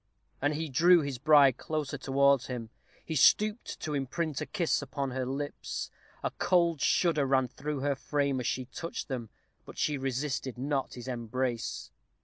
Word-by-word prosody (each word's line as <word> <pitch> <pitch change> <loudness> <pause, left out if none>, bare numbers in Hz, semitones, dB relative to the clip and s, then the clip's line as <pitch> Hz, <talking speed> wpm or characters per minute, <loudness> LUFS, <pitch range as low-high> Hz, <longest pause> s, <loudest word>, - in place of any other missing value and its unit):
And 145 +2 +1
he 160 +1 -2
drew 170 +6 +5
his 140 -4 -4
bride 140 -3 +6
closer 150 -2 -3
towards 140 -1 +3
him. 120 -3 -5 0.3
He 160 - -4
stooped 210 - +3
to 155 - -3
imprint 145 +2 -2
a - - -3
kiss 175 -8 0
upon 140 -1 -3
her 130 0 -2
lips. 145 +2 -4 0.3
A - - -1
cold 170 -5 +2
shudder 155 -6 +2
ran 130 -1 +3
through 145 +2 -4
her 145 +1 +1
frame 140 0 -1
as 125 - -2
he 130 - -1
touched 165 +6 -6
them, 120 -4 -4 0.3
but - - -12
she 150 -2 0
resisted 135 -1 -2
not 135 0 -2
his 120 0 -8
embrace. 120 0 -3
140 Hz, 165 wpm, -30 LUFS, 130-150 Hz, 0.3 s, bride